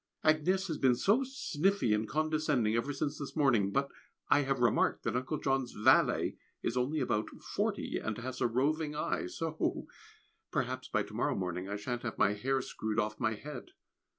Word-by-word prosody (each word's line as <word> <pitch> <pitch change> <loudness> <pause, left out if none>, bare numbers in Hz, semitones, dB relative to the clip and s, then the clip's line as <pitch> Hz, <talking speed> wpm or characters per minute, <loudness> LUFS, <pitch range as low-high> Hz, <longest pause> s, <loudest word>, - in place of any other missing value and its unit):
Agnès 180 +5 +3
has 160 -4 -3
been 130 -2 +4
so 210 - +3
sniffy 195 - 0
and 105 0 0
condescending 155 -7 +1
ever 115 +5 0
since 145 +1 -2
this 140 - -6
morning; 120 -10 +3
but 140 +7 0 0.4
I 145 - +6
have 135 -1 0
remarked 120 -3 +2
that - - -1
Uncle 130 +5 -1
John's 135 -2 0
valet 105 - +3 0.3
is - - -1
only 135 +5 0
about 110 -4 0
forty - - -2
and 110 -1 -3
has 130 +2 -5
a 120 - +4
roving 150 +5 0
eye! 150 - -1
so 160 - -2 0.6
perhaps - - -2
by - - 0
to - - -12
morrow - - 0
morning 90 0 -3
I 100 - -2
shan't 120 +4 -3
have 120 - -4
my 100 - +4
hair 130 +5 0
screwed 110 0 -4
off 110 0 -1
my 110 0 +1
head! 150 - -9
135 Hz, 180 wpm, -32 LUFS, 110-155 Hz, 0.6 s, I